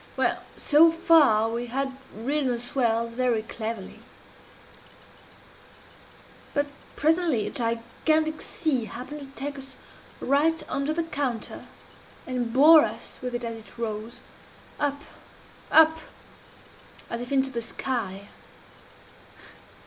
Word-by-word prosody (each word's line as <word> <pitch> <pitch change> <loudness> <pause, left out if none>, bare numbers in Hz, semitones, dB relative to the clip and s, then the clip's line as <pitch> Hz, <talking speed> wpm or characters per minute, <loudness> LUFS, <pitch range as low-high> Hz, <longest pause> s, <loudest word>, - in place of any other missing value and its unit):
"Well, - - +2 0.2
so 315 +3 +6
far 305 -10 +5
we 240 +1 -3
had 270 +2 -2 0.2
ridden 275 +6 -1
the 245 -2 0
swells 230 -2 0
very 240 -3 +1
cleverly; 220 -3 -6 2.6
but 285 0 +2 0.3
presently 315 -7 +2
a - - -4
gigantic 280 +7 -1
sea 265 -8 -1
happened 255 +7 -7
to 280 - -9
take 280 +1 -4
us 270 0 -10 0.4
right 310 +4 +2
under 280 +2 -1
the 335 +2 0
counter, 275 -8 -4 0.6
and 250 -2 -2
bore 300 +5 +8
us 225 +1 -6
with 250 -1 -4
it 240 - -3
as 230 -1 -4
it 225 +1 -12
rose 225 0 -5 0.6
up 285 -1 -1 0.7
up 320 0 +6 1.1
as 235 - -4
if 245 - -7
into 270 -1 +2
the 235 - -3
sky. 220 -5 -4
255 Hz, 115 wpm, -26 LUFS, 230-295 Hz, 2.6 s, bore